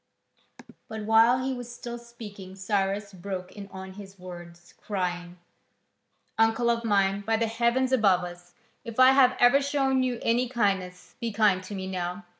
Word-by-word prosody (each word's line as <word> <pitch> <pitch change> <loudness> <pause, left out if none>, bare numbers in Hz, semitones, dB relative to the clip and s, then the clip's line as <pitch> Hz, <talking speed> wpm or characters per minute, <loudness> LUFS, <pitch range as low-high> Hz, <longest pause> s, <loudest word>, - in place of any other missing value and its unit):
But 220 -1 -6
while 230 +3 +4
he 265 - -1
was 245 -1 -7
still 240 0 -7
speaking 210 -5 -11
Cyrus 195 +1 -2
broke 185 0 -6
in 200 -1 -9
on 190 -1 -9
his 195 0 -12
words, 175 -1 -11
crying: 180 -3 -3 1.0
"Uncle 225 +2 +3
of 230 0 -2
mine, 200 -2 +1
by 225 +2 0
the 230 - +1
heaven 235 +3 +1
above 195 -7 +3
us, 175 0 -10 0.3
if 230 +1 -7
I 255 0 +8
have 260 -2 +4
ever 245 +4 +5
shown 275 -2 +1
you 250 -2 -1
any 240 +2 +1
kindness, 195 -6 -2
be 235 -2 -3
kind 205 -3 +2
to 205 - -7
me 190 -1 -5
now. 180 +1 -4
205 Hz, 165 wpm, -27 LUFS, 190-235 Hz, 1.0 s, I